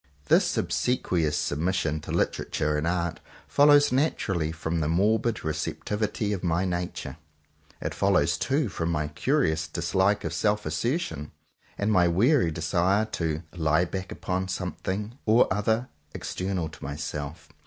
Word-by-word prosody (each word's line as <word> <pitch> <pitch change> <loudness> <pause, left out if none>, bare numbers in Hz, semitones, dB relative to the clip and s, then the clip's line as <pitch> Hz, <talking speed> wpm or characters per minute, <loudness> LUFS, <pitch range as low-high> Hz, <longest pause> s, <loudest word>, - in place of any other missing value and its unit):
This - - +4
obsequious 85 -11 0
submission 80 0 0
to - - -8
Literature 75 0 0
and 75 +2 0
Art. 85 -1 -1 0.3
follows 145 -1 +5
naturally 100 - 0
from 80 +1 -2
the 75 - 0
morbid 105 +6 +1
receptivity 105 +7 -2
of 95 - -4
my 85 +1 +1
nature. 90 -2 -3 0.6
It - - -3
follows - - +2
too 140 0 +1
from 85 -3 -3
my 75 -2 -1
curious 80 - +1
dislike 95 +4 +1
of - - -3
self 105 -1 +1
assertion, 80 - -2 0.4
and 100 +2 0
my 90 -4 +5
weary 100 - +3
desire 85 +6 +1
to 80 -1 -2
"lie 80 +1 +2
back" 95 +1 -5
upon 95 0 -2
something 95 - -4
or 110 +3 +6
other 110 +5 0 0.3
external 90 -3 -2
to 80 - -13
myself. 75 +2 -5
90 Hz, 135 wpm, -27 LUFS, 80-105 Hz, 0.6 s, or